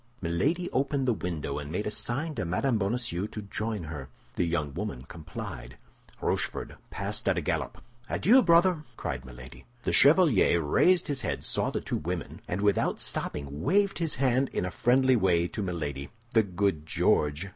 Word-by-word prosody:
Milady 135 - 0
opened 135 0 0
the 120 - +4
window, 80 -8 -3
and 75 0 -7
made 100 +5 -2
a 105 - -2
sign 135 +9 -1
to - - -3
Mme. 105 +8 0
Bonacieux 100 -2 -1
to 110 - -7
join 105 0 -3
her. 75 -4 -7 0.3
The 90 - +1
young 75 -4 -1
woman 65 - -4
complied. 65 -6 -8 0.4
Rochefort - - -2 0.2
passed - - -2
at - - +1
a - - +1
gallop. - - -3 0.3
"Adieu, 250 +7 +5
brother!" 170 -3 +4
cried 65 -1 -4
Milady. 65 0 -12 0.2
The - - 0
chevalier 140 - +5
raised 170 - +3
his 140 -3 -2
head, 100 - -3
saw - - 0
the - - -3
two - - -2
young - - -7
women, 85 -2 -4
and 90 +3 -2
without 100 -1 +1
stopping, 70 0 -3
waved 200 - +2
his 165 -3 -1
hand 130 +1 +2
in - - -2
a 90 - -3
friendly 130 +4 +3
way 90 -5 +2
to - - -4
Milady. 75 -7 -4 0.2
"The 110 - +6
good 95 -5 -1
George!" 75 +4 +1
100 Hz, 180 wpm, -28 LUFS, 80-135 Hz, 0.4 s, The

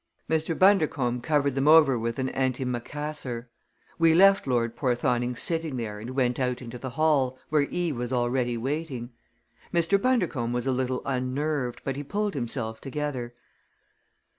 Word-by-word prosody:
Mr. 160 0 0
Bundercombe 150 -11 +3
covered 145 -1 +1
them 135 +2 0
over 155 -4 +7
with 115 +1 -2
an 130 -1 -1
antimacassar. 130 0 -3 0.5
We 165 -1 +5
left 195 -2 +5
Lord 120 -2 0
Porthoning 125 -1 0
sitting 160 0 -1
there 105 -3 -4
and 120 +4 -7
went 125 -2 +1
out 125 -1 0
into 125 -1 -8
the 130 - -5
hall, 140 -5 +2
where 150 -1 +3
Eve 175 -6 -2
was 120 +1 -3
already 120 -1 0
waiting. 130 -1 -3 0.6
Mr. 175 +4 +2
Bundercombe 175 - +1
was 125 - -1
a 135 - +1
little 130 0 -1
unnerved, 130 0 -2
but 135 -1 -3
he 145 - -4
pulled 205 +7 -2
himself 120 -4 -3
together. 135 -4 -4
130 Hz, 150 wpm, -27 LUFS, 120-155 Hz, 0.6 s, over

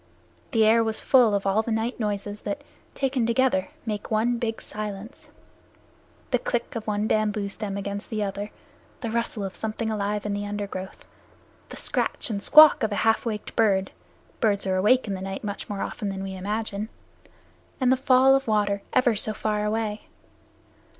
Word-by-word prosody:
The 225 -4 +3
air 230 +1 +5
was 220 -1 -1
full 240 -6 +4
of 200 - -1
all 195 +2 +3
the 225 - -6
night 225 +3 -1
noises 205 -1 -3
that, 205 - -4 0.3
taken 265 -4 0
together, 235 -5 +2 0.2
make 210 -2 -4
one 230 +2 +1
big 225 -1 -2
silence 210 +3 -6 1.0
the - - +3
click - - -2
of 225 -1 -5
one 210 0 0
bamboo 210 -2 0
stem 200 -1 -5
against 200 0 -5
the 215 -2 -1
other, 200 +1 -4 0.5
the 230 -4 -3
rustle 230 -2 -1
of 195 -1 -4
something 220 0 -3
alive 210 0 -2
in 205 - -1
the 205 0 -2
undergrowth, 200 -2 -5 0.6
the - - -9
scratch - - -1
and 200 -2 -2
squawk 305 +4 +8
of 220 -2 0
a - - -1
half 225 +1 +2
waked 210 -2 -4
bird 195 -4 +2 0.5
(birds 205 -3 +1
are 190 -1 +1
awake 220 +6 +3
in 200 - -2
the 190 - -5
night 195 0 -5
much 205 -1 -5
more 200 -1 -3
often 210 -3 -4
than 195 0 -4
we 195 0 -5
imagine), 210 +2 -3 0.9
and 255 -2 +3
the - - +6
fall 260 0 +5
of 270 -1 +1
water 205 -2 +1
ever 255 -3 +4
so 215 +1 0
far 210 0 -1
away. 215 0 -2
215 Hz, 180 wpm, -25 LUFS, 200-230 Hz, 1.0 s, squawk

